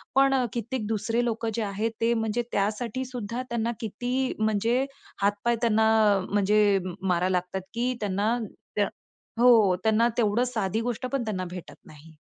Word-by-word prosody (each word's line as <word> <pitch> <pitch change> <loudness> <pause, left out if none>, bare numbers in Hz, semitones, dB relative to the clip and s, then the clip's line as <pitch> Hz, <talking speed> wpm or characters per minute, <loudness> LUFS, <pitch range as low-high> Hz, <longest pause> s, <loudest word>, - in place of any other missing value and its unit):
पण 270 0 +5
अ, 255 - +2
कित्येक 235 -1 -3
दुसरे 225 +2 0
लोकं 230 -1 -1
जे 230 - -1
आहेत 210 +3 -2
ते 235 +1 +3
म्हणजे 225 +1 0
त्यासाठी 220 +5 -1
सुद्धा 245 0 -5
त्यांना 235 0 -1
किती 250 +3 -2
म्हणजे 225 +5 +1 0.4
हात-पाय 205 +4 +1
त्यांना 220 -1 +3 0.4
म्हणजे 205 0 +3 0.2
मारायला 185 0 +1
लागतात 180 +2 -4
की 245 +2 0
त्यांना 205 +4 0 0.4
त्या 205 -1 +2 0.5
हो, 225 -6 +6
त्यांना 220 +2 +3
तेवढं 225 +1 +2
साधी 220 0 -1
गोष्ट 240 +1 -3
पण 265 -3 0
त्यांना 185 -4 -2
भेटत 180 -1 -9
नाही. 155 +1 -15
220 Hz, 150 wpm, -26 LUFS, 205-240 Hz, 0.5 s, हो